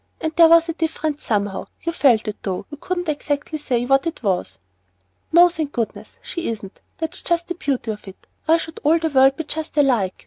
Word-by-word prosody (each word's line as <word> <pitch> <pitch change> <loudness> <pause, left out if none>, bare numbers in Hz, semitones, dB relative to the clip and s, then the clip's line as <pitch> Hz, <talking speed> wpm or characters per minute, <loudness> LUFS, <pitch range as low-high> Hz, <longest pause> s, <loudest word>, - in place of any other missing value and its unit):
There 330 0 +7
was 335 0 +6
a 330 - -2
difference 315 -2 -2
somehow, 205 -3 -1 0.2
you 335 - -1
felt 255 -10 +3
it 210 - -3
though 190 0 -3
you 290 - -7
couldn't 355 +4 -3
say 310 - +1
exactly 290 -4 -2
what 270 +4 +3
it 330 - -5
was." 190 -4 -1 0.7
"No, 345 +2 +8
thank 320 -4 -4
goodness 230 -2 -4
she 340 -1 -4
isn't; 210 -4 -7 0.2
that's 320 -1 -4
just 340 0 0
the - - 0
beauty 275 -9 -2
of 210 -1 -9
it. 195 - -12 0.2
Why 325 +1 +5
should 320 -1 -7
all 310 +3 +4
the 325 -1 -1
world 270 -1 +4
be 320 - -2
just 310 0 -5
alike? 240 -10 +2
295 Hz, 205 wpm, -21 LUFS, 235-330 Hz, 0.7 s, No